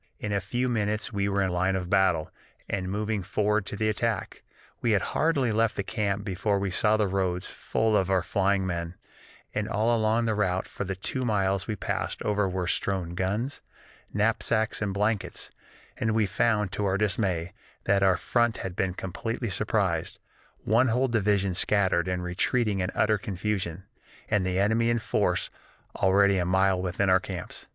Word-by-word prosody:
In 105 - -4
a 100 - +1
few 120 +6 -1
minutes 105 -2 -1
we 100 0 0
were 100 0 +1
in 95 - 0
line 95 +2 +1
of 90 -1 -2
battle, 90 -5 +2 0.4
and 95 -2 -2
moving 105 +1 -1
forward 105 +2 0
to - - -4
the 110 +1 0
attack. 110 -1 -1 0.4
We 115 -2 +2
had 100 - +2
hardly 140 -7 +2
left 110 +1 +1
the 100 - -2
camp 100 -1 -2
before 100 +1 0
we 100 -1 -1
saw 105 +3 +3
the 105 -2 +2
roads 90 -2 -1
full 110 -1 0
of 95 -2 +2
our 95 -2 +2
flying 95 +2 +1
men, 85 -1 -3 0.6
and - - -2
all 110 +4 +2
along 110 +1 +2
the 110 - +1
route 95 -3 0
for - - -5
the 95 +1 -3
two 130 +7 -2
miles 100 -4 0
we 110 - -2
passed 95 - -3
over 105 -2 +1
were 90 -1 -2
strewn 90 0 -1
guns, 105 +10 -2 0.5
knapsacks, 110 +1 +1
and 105 -2 0
blankets, 105 +1 -1 0.5
and 110 0 0
we 110 -2 +3
found, 105 0 +1
to 105 - -2
our 95 0 +1
dismay, 95 -5 0 0.3
that 100 0 +2
our 95 -1 +4
front 120 -2 +1
had 90 -2 -5
been 95 -2 -1
completely 115 +5 -4
surprised, - - 0 0.5
one 115 +5 +3
whole 125 +3 +2
division 100 -4 +1
scattered 95 -2 +2
and 90 -1 -1
retreating 100 +4 0
in 90 0 0
utter 105 -1 +2
confusion, 95 -3 -3 0.5
and 100 -3 +2
the 90 0 -1
enemy 110 +4 +2
in 120 - +2
force 110 - 0 0.5
already 100 0 +4
a - - +1
mile 95 0 +2
within 95 +2 0
our 95 0 +5
camps. 90 -2 -7
100 Hz, 180 wpm, -27 LUFS, 95-110 Hz, 0.6 s, our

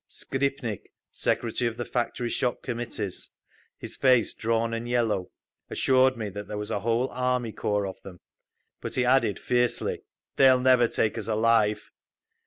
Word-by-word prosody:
Skripnik, 135 -6 -3 0.2
Secretary 120 +1 0
of 115 - -11
the 120 - -3
Factory 120 0 -2
Shop 125 -1 -1
Committees, 115 -5 -4 0.5
his - - -8
face 130 -4 +3
drawn 115 0 0
and 115 +1 -4
yellow, 110 -6 0 0.4
assured 130 -1 +3
me 110 -2 -3
that 100 +1 -7
there 105 - -5
was 105 0 -4
a 105 - 0
whole 115 +4 0
army 125 -2 -1
corps 105 -1 -1
of 95 - -7
them, 90 -3 -11 0.6
but - - -5
he 125 - +2
added, 125 -5 +3
fiercely, 125 -1 0 0.4
"They'll 130 -2 +6
never 125 -2 +5
take 110 - -1
us - - -6
alive!" 110 -1 +2
115 Hz, 155 wpm, -27 LUFS, 105-125 Hz, 0.6 s, They'll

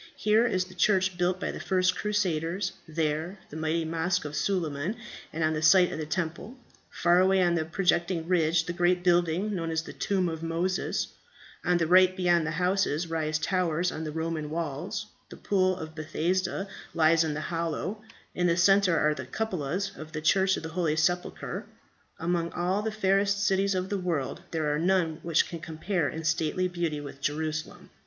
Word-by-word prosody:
Here 215 +3 +3
is 185 -5 0
the 185 - -14
church 190 0 +2
built 180 +1 0
by - - -2
the - - -7
first 185 -1 +1
crusaders; 185 -3 -1 0.2
there 160 +3 -2
the - - -8
mighty 160 +1 -1
mosque 165 +2 -1
of 150 0 -5
Suleiman 170 -1 -1 0.4
on 160 0 0
the 155 - -2
site 180 +3 +6
of - - -5
the 155 - -4
Temple; 170 - -3 0.3
far 175 +1 +3
away 190 +1 +4
on 175 -1 +2
a 160 -2 0
projecting 170 -1 0
ridge 165 -2 +2
the 175 - -3
great 175 +1 +2
building 175 +3 +2
known 165 -3 -2
as 160 0 -1
the - - -9
Tomb 190 -3 0
of 160 -1 -4
Moses; 165 +3 -1 0.5
on 180 0 +3
the 165 - +1
right 185 +2 +5
beyond 175 -3 +2
the 160 0 -3
houses 180 -3 0
rise 155 -1 0
the 155 - -3
towers 180 -2 +1
on 160 - -5
the 155 - -4
Roman 160 -1 -3
walls; 160 +1 -3 0.2
the - - -10
Pool 185 -2 +1
of 160 0 -7
Bethsaida 175 +5 -1 0.3
lies 165 0 +4
in 155 -2 -2
the 155 - -3
hollow; 170 +5 -2 0.3
in 180 0 +1
the 170 0 +2
centre 195 -1 +4
are 155 0 +3
the 130 -3 -7
cupolas 190 -1 -2
of 155 0 -10
the 155 - -3
Church 190 +4 +3
of - - -6
the 160 - -5
Holy 160 -2 0
Sepulchre. 175 +3 -1 0.5
Among 170 0 -1
all 180 +3 0
the 220 +1 -2
fairest 200 -1 +1
cities 195 0 +2
of 185 +1 -2
the 200 - -1
world, 170 -7 -2
there 155 -3 0
are 150 - 0
none 170 -2 +1
which 165 -1 +2
can 170 - -6
compare 160 0 -2
in 160 - -6
stately 165 +3 +1
beauty 170 -4 -2
with 140 -1 -9
Jerusalem. 155 +2 -3
170 Hz, 190 wpm, -28 LUFS, 160-185 Hz, 0.5 s, site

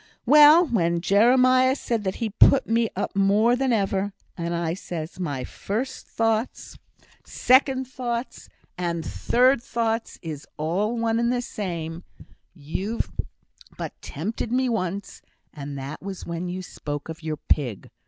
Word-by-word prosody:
Well! 300 +4 +8
when 170 - +1
Jeremiah 255 +7 +4
said 230 -5 -2
that, 190 - -1
he 225 -2 -3
put 265 +5 +5
me 230 0 +2
up - - -3
more 205 +5 +4
than 265 0 0
ever, 200 -2 0 0.2
and 170 0 -3
I 170 -1 -1
says, 170 -2 -6
'My 145 -8 -3
first 225 - -4
thoughts, 225 +1 -1 0.5
second 260 0 +3
thoughts, 245 -1 -5 0.3
and 170 -2 -2
third 255 - +2
thoughts 230 -1 -2
is 155 -3 -6
all 195 +9 -1
one 230 0 +1
and 235 +1 +1
the 245 0 -1
same; 170 -6 -5 0.5
you've 190 +9 -3 0.7
but - - -5
tempted 215 +9 -4
me 255 +1 +1
once, 200 -2 -3 0.3
and 140 -1 -7
that 135 +3 -6
was 195 -1 -7
when 170 +1 -4
you 185 +1 -5
spoke 145 -4 -6
of 160 0 -8
your 155 -1 -3
pig. 125 -8 -1
200 Hz, 145 wpm, -24 LUFS, 170-240 Hz, 0.7 s, Well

